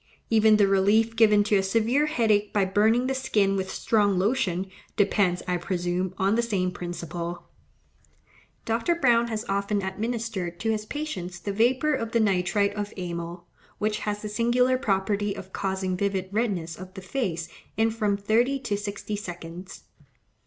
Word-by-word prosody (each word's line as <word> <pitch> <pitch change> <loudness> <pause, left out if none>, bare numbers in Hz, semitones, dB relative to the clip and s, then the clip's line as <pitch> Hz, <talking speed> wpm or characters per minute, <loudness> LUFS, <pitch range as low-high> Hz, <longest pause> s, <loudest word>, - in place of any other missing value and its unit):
Even 220 -1 +5
the 205 -2 +4
relief 205 +4 +3
given 210 -2 +5
to 205 0 +2
a - - +3
severe 230 +9 +2
headache 215 -7 +2
by 205 -2 +2
burning 220 +6 +3
the 265 - 0
skin 205 -7 +1
with 190 -1 -2
strong 205 -3 +1
lotion, 190 -3 +1 0.3
depends, 195 -3 +2
I 180 0 +1
presume, 180 +1 -2
on 195 +2 +2
the 235 - +3
same 195 -6 0
principle. 175 -1 -6 1.2
Dr. 230 +10 +1
Browne 235 -6 +3
has 220 0 -3
often 200 +1 0
administered 200 -3 -3
to 225 - +1
his 215 -1 -3
patients 190 - -4
the 200 +3 -4
vapour 255 +8 +2
of 230 -4 -3
the 230 - +3
nitrite 200 0 +2
of 205 0 -4
amyl, 170 -1 -5 0.3
which 210 0 -1
has 210 0 -3
the - - -3
singular 240 +4 +2
property 200 -2 0
of 190 -2 -10
causing 190 -1 -1
vivid 190 -1 -1
redness 195 -7 -1
of 185 0 -10
the 190 - -7
face 180 -6 -2 0.3
in 225 +1 +3
from 210 -3 0
thirty 230 +7 +2
to 210 -5 -1
sixty 205 0 -4
seconds. 175 -2 -8
205 Hz, 160 wpm, -26 LUFS, 185-225 Hz, 1.2 s, Even